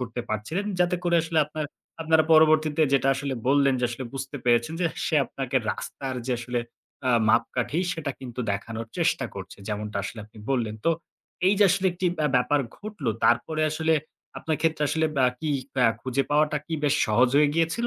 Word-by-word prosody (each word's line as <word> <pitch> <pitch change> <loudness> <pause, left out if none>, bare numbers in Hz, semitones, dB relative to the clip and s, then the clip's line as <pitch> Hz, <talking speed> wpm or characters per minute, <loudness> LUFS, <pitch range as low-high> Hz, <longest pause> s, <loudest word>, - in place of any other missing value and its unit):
করতে 120 -1 -4
পারছিলেন। 110 - -2 0.2
যাতে 180 0 +3
করে 170 -1 +3
আসলে 165 -1 -1
আপনার 150 0 -4 0.4
আপনারা 160 -1 +4
পরবর্তীতে 155 0 +5
যেটা 135 0 +3
আসলে 135 0 -3
বললেন 140 -1 +4
যে - - +1
আসলে 125 +2 -5
বুঝতে 135 +2 -5
পেরেছেন 120 +5 +2
যে 175 - +3 0.2
সে - - 0
আপনাকে 135 -1 -3
রাস্তার 135 -2 -5
যে 130 - 0
আসলে 120 +1 -3 0.5
আ - - +4 0.2
মাপকাঠি 125 +6 +1
সেটা 160 -4 -4
কিন্তু 125 -1 -6
দেখানোর 110 +3 -5
চেষ্টা - - +1
করছে। - - -8
যেমনটা 105 0 -3
আসলে 110 - -6
আপনি 110 +1 -17
বললেন। 115 -5 0
তো - - +5 0.6
এই 200 - +5
যে 205 - +6
আসলে 195 0 +1
একটি 180 +1 -2 0.2
আ - - +4
ব্যাপার 140 +3 +2 0.2
ঘটলো 205 - -4
তারপরে 155 +6 +2
আসলে 160 +1 +1 0.4
আপনার 155 -2 -1
ক্ষেত্রে 160 -2 +1
আসলে 160 +1 +1
বা 130 - +4 0.2
কি 155 - -2 0.3
বা 125 - +3 0.2
খুঁজে 130 +2 0
পাওয়াটা 150 0 +2
কি 165 - -3
বেশ 145 0 +3
সহজ 120 +4 +4
হয়ে 150 0 +5
গিয়েছিল? 165 +9 +1
145 Hz, 185 wpm, -26 LUFS, 125-160 Hz, 0.6 s, যে